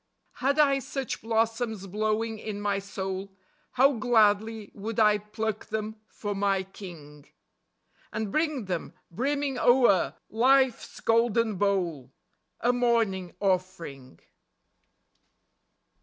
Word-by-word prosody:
Had 275 +3 +2
I 280 -2 +4
such 270 -1 -4
blossoms 225 -2 -1
blowing 215 +3 -1
in 210 -1 -5
my 205 -1 0
soul 195 0 -5 0.4
How 270 +3 +5
gladly 220 -2 +2
would 215 +2 -4
I 210 -1 +5
pluck 215 +1 -4
them 220 0 -4
for 205 -1 -5
my 195 -1 +1
King, 160 -7 -12 0.8
And 215 -2 -3
bring 305 -5 0
them, 180 -3 -4 0.2
brimming 275 +5 -1
o'er 245 -7 +4
Life's 260 +2 +2
golden 230 -1 +2
bowl, 175 -10 0 0.5
A 245 +1 +3
morning 225 -8 +1
offering. 180 - -2
215 Hz, 105 wpm, -27 LUFS, 195-235 Hz, 0.8 s, How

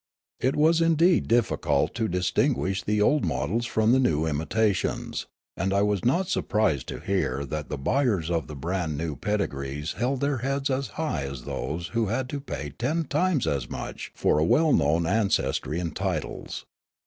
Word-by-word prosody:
It 130 - +1
was 160 +2 +4
indeed 165 +2 +4
difficult 90 -10 +1
to 115 -2 -1
distinguish 95 +2 +1
the 105 +3 0
old 150 +3 +3
models 85 - -1
from 110 0 +2
the 130 - +5
new 80 - +2
imitations; 90 +6 -1 0.3
and 95 +2 -1
I 100 - +3
was 105 -3 0
not 175 +10 +2
•surprised 105 - 0
to - - -6
hear 70 -8 -1
that 75 +1 -5
the 75 - -3
buyers 95 - +1
of 85 -2 -1
the 75 - -7
brand 80 +1 -2
new 80 -1 -3
ped 105 +4 -1
igrees 70 -1 -4
held 125 +5 0
their 140 -1 +1
heads 135 +3 -1
as 130 0 -1
high 150 - -1
as 70 -3 -6
those 85 +3 -4
who 115 +1 0
had 125 +5 -1
to 145 - -3
pay 75 - -5
ten 145 - -1
times 155 0 +1
as 65 -4 -1
much - - -6
for 75 - +2
a - - +3
well 155 - +4
known 80 +4 +3
ancestr}' 85 -6 0
and 85 -3 -4
titles. - - -3
100 Hz, 180 wpm, -26 LUFS, -, 0.3 s, the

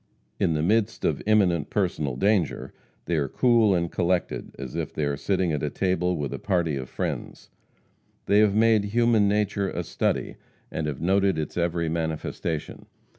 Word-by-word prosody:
In 80 - +2
the 75 0 0
midst 110 +4 +1
of - - 0
imminent 90 -8 +3
personal 85 -10 -1
danger 95 +1 0 0.3
they 85 - 0
are 70 -2 0
cool 115 - +3
and 85 -1 -1
collected 90 0 -1
as 65 -3 -7
if - - -3
they 75 - -2
were 70 0 -1
sitting 95 +3 0
at 75 - -1
a 75 - -1
table 90 +1 0
with 70 -2 -3
a - - -5
party 85 -6 0
of 65 -1 -5
friends. - - -5 0.7
They 100 - +4
have 105 -2 +4
made 110 -1 +4
human 115 -1 +3
nature 100 -1 0
a - - -3
study, - - -2 0.3
and 80 -1 -3
have 75 -2 -4
noted 95 0 +2
its 75 - -4
every 85 -1 0
manifestation. 80 -1 -3
90 Hz, 175 wpm, -25 LUFS, 80-100 Hz, 0.7 s, They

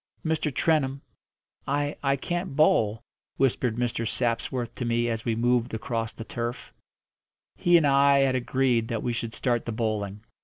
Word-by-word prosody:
"Mr. 160 -1 0
Trentham, 140 -2 +1 0.6
I 145 +1 0
I 140 -1 +2
can't 175 +3 -3
bowl," 115 -7 +3 0.3
whispered 125 -3 +1
Mr. 115 -1 -1
Sapsworth 120 0 -2
to - - -5
me 120 0 +1
as 115 -1 -3
we 115 -2 0
moved 120 0 +1
across 115 -1 -3
the - - -8
turf. 120 +1 -5 0.8
He 175 0 +4
and 160 - +3
I 140 0 +5
had 135 -1 +3
agreed 125 -2 +1
that 115 -2 -3
we 120 - -1
should 115 -1 -4
start 120 -3 0
the - - -1
bowling. 105 -3 -2
120 Hz, 160 wpm, -26 LUFS, 115-140 Hz, 0.8 s, I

